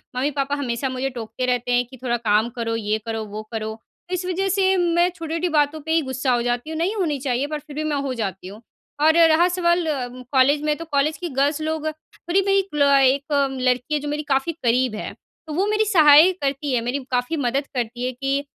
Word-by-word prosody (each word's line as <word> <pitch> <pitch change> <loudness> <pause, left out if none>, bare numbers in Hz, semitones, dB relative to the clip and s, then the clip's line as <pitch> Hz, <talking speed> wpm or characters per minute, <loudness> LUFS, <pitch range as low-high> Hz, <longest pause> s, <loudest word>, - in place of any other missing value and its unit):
मम्मी-पापा 280 +1 -1
हमेशा 265 -2 -2
मुझे 260 +1 -2
टोकते 240 0 -5
रहते 245 -1 -1
हैं 245 0 +2
कि, 260 +2 -14
"थोड़ा 240 -1 0
काम 220 0 +1
करो, 230 -1 -2
ये 215 -1 -1
करो, 225 -1 -3
वो 210 +1 -7
करो।" 220 -1 -4 0.3
इस 365 0 -2
वजह 370 +2 -1
से 385 0 +2
मैं 345 0 +2
छोटी-छोटी 330 0 -3
बातों 300 0 +1
पे 320 - -3
ही 325 0 +3
गुस्सा 260 -1 -2
हो 240 - +1
जाती 245 +4 -2
हूँ, 320 - -4
नहीं 360 +7 0
होनी 335 -8 0
चाहिए, 260 0 -1
पर 305 0 -4
फिर 295 0 -13
भी 310 - -2
मैं 305 -1 -1
हो 260 - -2
जाती 195 -6 -4
हूँ। 205 +4 -11 0.4
और 315 +1 +5
रहा 325 +2 +4
सवाल 345 -1 +1 0.5
कॉलेज 280 +2 +4
में, 300 0 +1
तो 330 - -7
कॉलेज 300 0 0
की 350 - -5
गर्ल्स 290 +2 +1
लोग 315 0 -2
थोड़ी 340 +4 -3
मेरी 395 0 +2
एक 390 - -2
ल 295 - 0 0.2
एक 270 +2 +2 0.4
लड़की 255 +3 0
है, 300 - +2
जो 295 - -6
मेरी 295 +1 -2
काफ़ी 270 +4 +1
करीब 245 -1 +2
है। 215 - -5 0.4
तो 310 - -5
वो 370 +6 +1
मेरी 425 +1 +2
सहाय 320 -3 +7
करती 275 0 -1
है, 240 - +1
मेरी 245 +4 -2
काफ़ी 250 +6 0
मदद 275 +1 -1
करती 240 0 -3
है 255 - -1
कि, 275 +2 -2
280 Hz, 225 wpm, -22 LUFS, 245-320 Hz, 0.5 s, सहाय